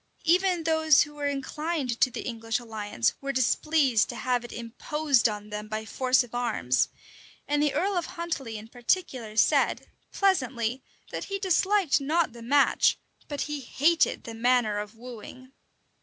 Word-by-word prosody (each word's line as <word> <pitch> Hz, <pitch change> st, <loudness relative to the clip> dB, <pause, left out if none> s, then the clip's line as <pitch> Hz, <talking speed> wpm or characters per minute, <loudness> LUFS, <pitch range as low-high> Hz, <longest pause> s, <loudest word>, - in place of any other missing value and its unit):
Even 360 Hz, 0 st, +2 dB
those 315 Hz, -2 st, +4 dB
who 295 Hz, -, -11 dB
were 290 Hz, -1 st, -3 dB
inclined 285 Hz, -2 st, -3 dB
to 255 Hz, -, +5 dB
the 235 Hz, -, -6 dB
English 225 Hz, -2 st, -2 dB
alliance 215 Hz, -, -2 dB
were 275 Hz, 0 st, -2 dB
displeased 260 Hz, -1 st, +2 dB
to -, -, -5 dB
have 245 Hz, 0 st, -1 dB
it 240 Hz, -, -9 dB
imposed 250 Hz, +2 st, 0 dB
on 210 Hz, 0 st, -7 dB
them 210 Hz, 0 st, -5 dB
by 215 Hz, 0 st, -4 dB
force 255 Hz, +2 st, +2 dB
of 245 Hz, -, -14 dB
arms; 225 Hz, -, +1 dB, 0.6 s
and 295 Hz, 0 st, +1 dB
the 295 Hz, -1 st, +1 dB
earl 390 Hz, +2 st, +1 dB
of 350 Hz, -2 st, -1 dB
Huntley 330 Hz, -10 st, -4 dB
in 215 Hz, +1 st, -10 dB
particular 240 Hz, -, -2 dB
said, -, -, +3 dB, 0.3 s
pleasantly, 255 Hz, -, 0 dB, 0.3 s
that -, -, -4 dB
he 395 Hz, -, -3 dB
disliked 380 Hz, -4 st, +2 dB
not 310 Hz, -1 st, +1 dB
the 235 Hz, -, -11 dB
match, 280 Hz, +4 st, +3 dB, 0.3 s
but 290 Hz, -2 st, -4 dB
he 300 Hz, -1 st, -3 dB
hated 310 Hz, +6 st, +2 dB
the 230 Hz, -, -7 dB
manner 230 Hz, -2 st, +2 dB
of 210 Hz, +1 st, -7 dB
wooing. 250 Hz, +2 st, -11 dB
255 Hz, 160 wpm, -27 LUFS, 230-310 Hz, 0.6 s, to